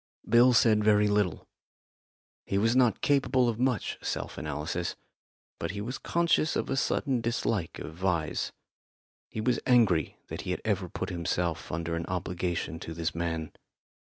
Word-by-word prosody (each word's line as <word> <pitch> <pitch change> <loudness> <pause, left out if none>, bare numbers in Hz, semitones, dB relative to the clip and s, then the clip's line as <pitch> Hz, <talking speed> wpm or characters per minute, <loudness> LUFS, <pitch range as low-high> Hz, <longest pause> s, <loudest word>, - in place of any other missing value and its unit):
Bill 120 +2 +6
said 110 -3 +4
very 105 0 +5
little. 105 -4 0 1.0
He 100 - 0
was 115 +4 +3
not 125 -3 +3
capable 135 -3 +3
of 115 -1 -1
much 125 -5 0
self - - -3
analysis, 80 +4 -3 0.6
but 85 - -2
he 100 - -4
was 120 +6 -4
conscious 170 -2 +1
of - - -1
a - - +1
sudden 135 -2 0
dislike 115 -6 -1
of 80 - -8
Vyse. 85 -5 0 0.8
He 110 - -4
was 120 +1 +1
angry 110 - +3
that - - -5
he - - -6
had - - -2
ever - - 0
put - - -4
himself 85 -1 -2
under 85 0 -2
an 85 - -3
obligation 90 -2 -2
to 80 - -7
this 80 -1 -2
man. 80 -2 -3
100 Hz, 160 wpm, -29 LUFS, 85-120 Hz, 1.0 s, Bill